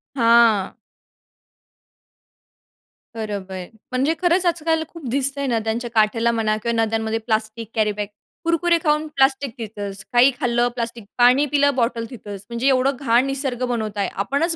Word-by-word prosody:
हां. 230 -5 +4 2.4
बरोबर. 195 -4 -5 0.3
म्हणजे 265 +5 +1
खरंच 355 +1 +2
आज-काल 325 -2 +1
खूप 330 -6 -10
दिसतं 275 +2 0
आहे 280 - -1
नद्यांच्या 230 +1 -1
काठेला 225 +1 +2
म्हणा 220 -2 0
किंवा 235 -1 +1
नद्यांमध्ये 225 0 -1
प्लास्टिक 220 0 -3
कॅरीबॅग, 210 -2 0 0.4
कुरकुरे 335 +1 +2
खाऊन 300 -1 +1
प्लास्टिक 270 -1 +2
तिथंच. 205 -3 -6
काही 245 +3 +6
खाल्लं 240 -3 +1
प्लास्टिक, 235 -1 -4
पाणी 250 +4 +5
पिलं 285 -1 +2
बॉटल 230 -2 0
तिथंच. 205 -5 -9
म्हणजे 235 +3 -1
एवढं 265 +1 +3
घाण 240 -1 +3
निसर्ग 270 -2 -2
बनवता 220 -4 -3
आहे. 195 - 0
आपणच 280 - +1
235 Hz, 135 wpm, -21 LUFS, 220-275 Hz, 2.4 s, काही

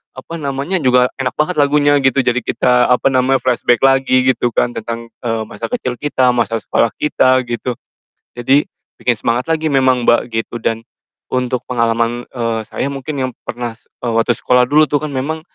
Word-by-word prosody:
apa 165 +5 -8
namanya, 140 +6 -2
juga 125 -2 +3
enak 130 -1 -2
banget 155 +4 0
lagunya, 145 0 +3
gitu. 135 0 +3
Jadi, 125 +1 +1
kita, 125 0 +2
apa 125 - +3
namanya, 130 0 +2
flashback 120 -1 +1
lagi 130 -1 +4
gitu 120 - -1
kan 120 - +2
tentang, 115 0 -6
eee, 115 -1 -1
masa - - -6
kecil 125 - -4
kita, 130 -4 +2
masa 115 -2 0
sekolah 115 +1 0
kita, 130 -3 +2
gitu. 120 +1 -3 0.6
Jadi, 135 +4 +3 0.4
bikin 120 -2 +1
semangat 120 +6 -1
lagi 160 -1 +1
memang, 130 -3 +2
Mbak, 120 - +3
gitu 115 +1 -3
dan 115 0 -1 0.5
untuk 125 0 -1
pengalaman, 115 0 0
eee, 115 -3 -2
saya - - -3
mungkin 140 +3 -5
yang 130 0 -1
pernah, 120 0 -4
eee, 115 +1 -7
waktu 115 +1 +2
sekolah 125 0 +3
dulu 155 +2 +5
tuh 145 -1 0
kan 150 - -3
memang, 150 +5 -3
125 Hz, 180 wpm, -16 LUFS, 120-135 Hz, 0.6 s, dulu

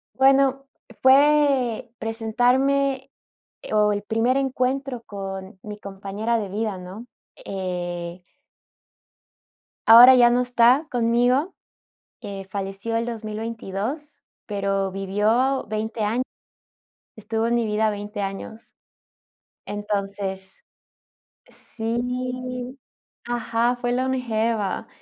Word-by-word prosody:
Bueno, 270 0 +3 0.4
fue 270 -3 +4
presentarme, 260 +5 +1 0.5
e - - -8
o, 210 -1 +4
el 205 0 -2
primer 225 +5 +1
encuentro 265 -1 -1
con 195 -2 -7
mi 210 0 -8
compañera 200 +4 -3
de 205 - -4
vida, 205 0 -3
¿no?, 190 +6 -9 0.4
eh 175 -2 -4 1.7
Ahora 245 +3 +11
ya 240 -1 +7
no 245 +1 +2
está 245 +4 +4
conmigo, 245 +7 +2 0.7
eh, 200 -4 -7
falleció 195 +3 -4
el 230 - 0
2022, 225 +4 -5 0.2
pero 195 -2 -1
vivió 215 +8 +1
20 215 +1 -2
años. 230 +5 0 0.9
Estuvo 225 +1 -2
en 235 - +1
mi 235 -1 +1
vida 215 +1 +1
20 205 0 -6
años. 195 +3 -6 0.9
Entonces. 200 -2 -4 0.8
Sí. 250 +2 -4 0.5
Ajá, 240 0 0
fue 245 0 -2
longeva, 230 -5 -1
225 Hz, 95 wpm, -23 LUFS, 205-250 Hz, 1.7 s, Ahora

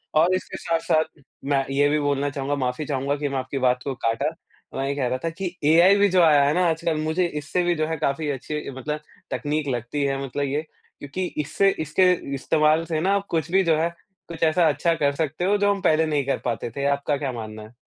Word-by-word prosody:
और 165 +4 +4
इसके 185 - -5
साथ-साथ 165 -1 +1 0.5
मैं 135 -1 +2
ये 145 +1 +3
भी 150 +1 +2
बोलना 145 0 0
चाहूँगा 140 0 -2
माफी 130 +2 -2
चाहूँगा 140 0 -1
कि 145 - -2
मैं 135 - -2
आपकी 130 +1 -4
बात 125 -1 +2
को 140 - -2
काटा। 115 -1 0 0.5
मैं 135 +1 -1
ये 140 - -1
कह 135 -3 0
रहा 130 +1 -1
था 165 - 0
कि 180 +2 -5 0.2
एआई 175 +4 +6
भी 205 0 +5
जो 185 -1 +4
आया 150 -3 +6
है 145 +2 +2
ना 180 +1 +2
आजकल 165 0 -1
मुझे 160 +4 +1
इससे 150 +5 -1
भी 175 0 +1
जो 155 -1 -1
है 160 0 -2
काफ़ी 145 +2 -1
अच्छी 150 +3 -5
मतलब 150 +3 -3 0.3
तकनीक 150 0 -2
लगती 125 +3 -2
है 135 0 -1
मतलब 140 +1 -3
ये, 140 +2 -1 0.4
क्योंकि 145 +6 -4 0.2
इससे 195 +7 +2
इसके 160 +4 +3 0.2
इस्तेमाल 155 +3 +2
से 160 -2 -1
ना 195 +3 +2
कुछ 160 0 -1
भी 190 +1 +4
जो 165 -3 +3
है, 165 +1 +1 0.4
कुछ 165 -1 -5
ऐसा 160 +1 +4
अच्छा 170 - +1
कर 140 -2 +1
सकते 160 +3 -2
हो 205 +2 +3
जो 205 0 +3
हम 200 - -6
पहले 160 -3 +3
नहीं 150 -3 0
कर 140 - 0
पाते 120 -1 -2
थे। 140 - -2
आपका 140 +1 +1
क्या 135 -1 -3
मानना 110 -2 -7
है? 110 - -14
150 Hz, 230 wpm, -24 LUFS, 140-165 Hz, 0.5 s, एआई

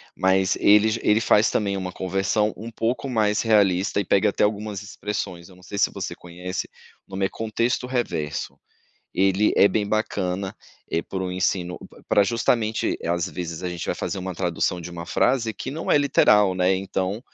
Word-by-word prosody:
mas 95 0 +2
ele 105 +1 +6 0.2
ele 105 +1 +4
faz 110 -1 +4
também 100 -2 0
uma 95 -1 -4
conversão 95 +4 0
um 115 +2 -8
pouco 120 +4 -2
mais 105 -3 +1
realista 100 -3 +2
e 100 - -1
pega 100 +3 +3
até 100 - 0
algumas 105 -1 -3
expressões, 100 -3 -5
eu 90 - -16
não 90 - -19
sei 100 - -7
se - - +3
você - - -5
conhece, 90 +2 -6 0.4
o - - -25
nome 95 0 -1
é - - -1
"Contexto 115 +3 -1
Reverso". 75 - -3 0.5
Ele 95 +2 +2
é - - +7
bem 100 +1 -1
bacana, 100 -3 -1 0.4
é 85 - +1
para 95 +1 -5
o 90 - -3
ensino 90 -1 -1 0.3
para 105 - +4
justamente, 115 0 0
às 85 +1 0
vezes 85 -2 -6
a 90 - -1
gente 85 -1 -5
vai - - -1
fazer 100 - -3
uma 95 -1 -5
tradução 90 0 -1
de 85 +1 -8
uma 85 0 -7
frase 120 -3 +1
que 130 - -5
não 160 +3 -3
é - - +6
literal, 105 -8 +4
né, 90 +1 +2
então 95 +2 -2
100 Hz, 185 wpm, -24 LUFS, 90-110 Hz, 0.5 s, é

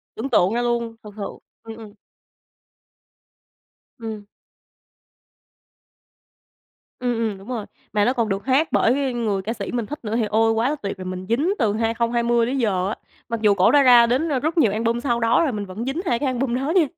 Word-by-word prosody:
Tưởng 255 +5 -4
tượng 200 -3 +3
ra 240 - 0
luôn, 235 -1 -1
thực 210 -1 -11
sự. 205 - -4 0.4
Ừm, 225 0 -9
ừm. 215 -2 -11 2.1
Ừm. 220 -2 -6 2.7
Ừm, 245 -1 0
ừm, 220 -4 -2
đúng 195 +4 -14
rồi. 235 -5 -4 0.3
Mà 205 -1 +2
nó 250 - +2
còn 230 -4 -1
được 195 +3 -3
hát 275 +4 +3
bởi 260 +2 +2
người 215 -5 -1
ca 220 +4 -3
sĩ 200 -4 -6
mình 235 -3 -2
thích 295 +5 -7
nữa 215 +1 -3
thì 230 - +1
ôi, 225 +2 +2
quá 225 +4 +1
là 300 - -1
tuyệt 200 -9 -5
rồi! 185 - -8
Mình 185 0 -5
dính 300 - +1
từ 215 -4 +2
2020 235 +1 +1
tới 265 +3 -2
giờ 195 -6 0
á, 215 - -3 0.3
mặc 230 -1 -3
dù 210 -2 +5
cổ 190 -1 +4
đã 290 -1 +6
ra 240 -2 +7
đến 265 +7 +1
rất 315 +5 -2
nhiều 225 -10 +4
album 230 +2 0
sau 240 -3 0
đó 230 +5 +3
rồi, 285 - 0
mình 205 -2 -4
vẫn 200 +6 -6
dính 285 +7 -2
2 240 -7 +1
cái 285 - -1
album 255 -1 -1
đó 270 +4 -2
nha. 345 -5 +5
230 Hz, 205 wpm, -22 LUFS, 215-250 Hz, 2.7 s, ra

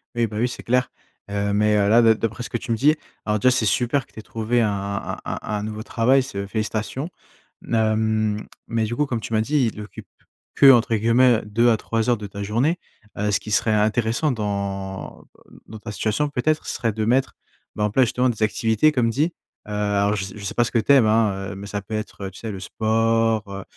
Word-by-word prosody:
Oui, 120 -1 +1
bah, 105 - -7
oui, 120 - +2
c'est - - -8
clair. 125 +1 +1 0.4
Heu, 100 0 -1
mais, 105 +1 +3
heu, 100 -1 +2
là 115 +3 +6
de 115 -1 +6
d'après 110 +1 -3
ce - - -6
que - - -2
tu 120 +1 -6
me - - +3
dis, 150 +6 +4 0.3
alors 105 0 0
déjà 130 +5 +4
c'est 125 -3 +1
super 125 +6 +1
que - - -29
tu - - -11
aies - - -6
trouvé 115 +2 -1
un 110 - +2
un 100 0 -4
un - - -4
un 105 -1 -3
nouveau 110 0 -5
travail, 130 +3 +3
c'est, 125 -6 -8
heu 100 - -4
félicitations. 110 - -3 0.6
N - - 0
hem, 110 -1 +1 0.2
mais 115 -1 0
du 115 +2 -3
coup, 150 - +1
comme 120 -5 -3
tu - - -7
m'as 110 - +3
dit, 130 0 +1
il 105 - -8
occupe 105 - -10 0.5
que 140 - +8
entre 120 -2 +3
guillemets, 115 +3 +4
heu - - -14
«2 115 +3 +2
à 115 - +3
3 115 +1 -1
heures 120 - +3
de 105 -1 -7
ta 100 +1 -6
journée». 120 - +1 0.4
Heu, 105 +1 0
ce 100 - +2
qui 110 - -9
serait 110 +1 +2
intéressant 110 +6 +1
dans, 100 -4 -4 0.3
heu, - - -16
dans 110 - -9
ta 105 0 -7
situation 110 +7 0
peut-être 150 +3 0
ce - - -2
serait 115 -2 0
de 110 0 -2
mettre, 130 +3 +1 0.4
ben, 105 - 0
en 105 - -1
place 130 +4 +4
justement 125 +2 +1
des 110 -2 -2
activités 110 +6 +2
comme 125 -5 +1
dit. 150 +9 0 0.3
Heu, - - -8
alors 105 0 +1
je 100 - -2
s - - -9
je 105 - -9
sais - - -4
pas 120 - +4
ce 120 - -4
que 120 - +2
tu 115 - +1
aimes, 135 -5 +6
hein, 105 -3 +1
heu, - - -9
mais 100 +1 -8
ça 105 0 -4
peut 100 +3 -10
être, 110 -2 -5
heu, 95 - -5
tu 95 - -13
sais 110 - -5
le 95 - -6
sport, 115 +2 +1
heu 100 0 -6
110 Hz, 255 wpm, -22 LUFS, 105-120 Hz, 0.6 s, que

